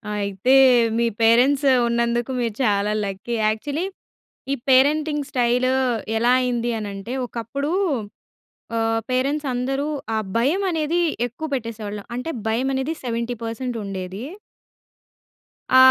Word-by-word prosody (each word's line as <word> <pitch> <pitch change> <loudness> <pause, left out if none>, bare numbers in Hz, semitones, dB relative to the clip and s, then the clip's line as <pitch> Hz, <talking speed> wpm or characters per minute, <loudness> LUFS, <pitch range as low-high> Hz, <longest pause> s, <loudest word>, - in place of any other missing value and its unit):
అయితే 200 +5 +1 0.4
మీ 235 - +2 0.2
పేరెంట్స్ 250 +5 +4 0.2
ఉన్నందుకు 235 +1 0
మీరు 230 -3 -1
చాలా 205 -2 +2
లక్కీ. 195 +4 -4
యాక్చువల్లీ 285 +10 -1 0.7
ఈ - - +1
పేరెంటింగ్ 295 +2 +3
స్టైలూ 250 +1 +2 0.5
ఎలా 235 +2 +3
అయిందీ 240 -1 0
అనంటే 200 +3 -6
ఒకప్పుడూ 245 +6 -4 1.1
ఆహ్, 225 0 +1
పేరెంట్స్ 275 +4 0
అందరూ 270 +3 -1 0.3
ఆ - - +1 0.2
భయమనేది 325 +4 +1 0.3
ఎక్కువ 250 +7 -6
పెట్టేసేవాళ్ళు. 220 -5 -4
అంటే 250 +6 -4 0.2
భయమనేది 265 +6 0
70 235 0 -2
పర్సెంట్ 235 +2 -4
ఉండేదీ. 190 +1 -5 1.5
ఆ! - - +8
240 Hz, 105 wpm, -22 LUFS, 225-270 Hz, 1.5 s, ఆ